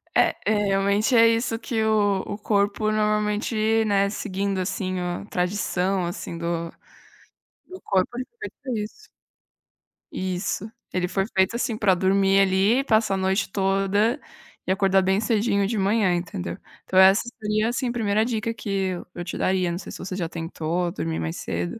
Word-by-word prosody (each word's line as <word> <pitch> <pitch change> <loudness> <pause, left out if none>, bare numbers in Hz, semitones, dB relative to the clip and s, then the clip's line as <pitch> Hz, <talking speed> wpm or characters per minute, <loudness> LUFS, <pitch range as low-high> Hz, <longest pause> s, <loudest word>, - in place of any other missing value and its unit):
É, - - +4
eh, 210 -1 +2
realmente 200 +5 +2
é 230 0 +7
isso 230 0 +1
que 225 -2 -1
o 205 -3 +2
o 205 - -5
corpo 210 0 +1
normalmente, 215 +1 +1
né, 200 -1 +2
seguindo, 195 -1 -2
assim, 185 0 -2
a 180 +2 -3
tradição, 185 -1 -1
assim, 170 -1 -5
do 170 0 -3 1.0
do 370 +1 -10
corpo, 195 +4 0
ele 255 - -3
foi 470 - -47
feito - - -38
pra 260 - -3
isso. 430 - -9 1.0
Isso, 185 +3 -3 0.2
ele 180 -1 0
foi 195 +1 0
feito, 190 +4 +3
assim, 235 -2 -1
pra 205 -3 +3
dormir, 195 +1 +3
ali, 195 +7 +3
passar 220 -5 +2
a - - 0
noite 190 +1 0
toda 195 +6 +1 0.5
e - - 0
acordar 195 0 +3
bem 190 +1 +2
cedinho 215 -3 +1
de 220 +1 -2
manhã, 195 -2 +2
entendeu? 175 - -4 0.3
Então, 185 - -2
essa 190 +2 +7 0.2
seria, 215 +1 0
assim, 250 +1 -1
a - - -1
1º 215 -2 +1
dica 230 -1 -1
que 220 - -8
eu 190 -2 -2
eu 175 - -5
te 185 - -5
daria, 185 -2 +1
não 170 - -3
sei 180 - -8
se - - -9
você 185 0 -5
já 175 -3 -2
tentou 165 +1 -3
dormir 80 - -3
mais 80 0 -3
cedo. 85 +1 -4
195 Hz, 175 wpm, -24 LUFS, 185-215 Hz, 1.0 s, é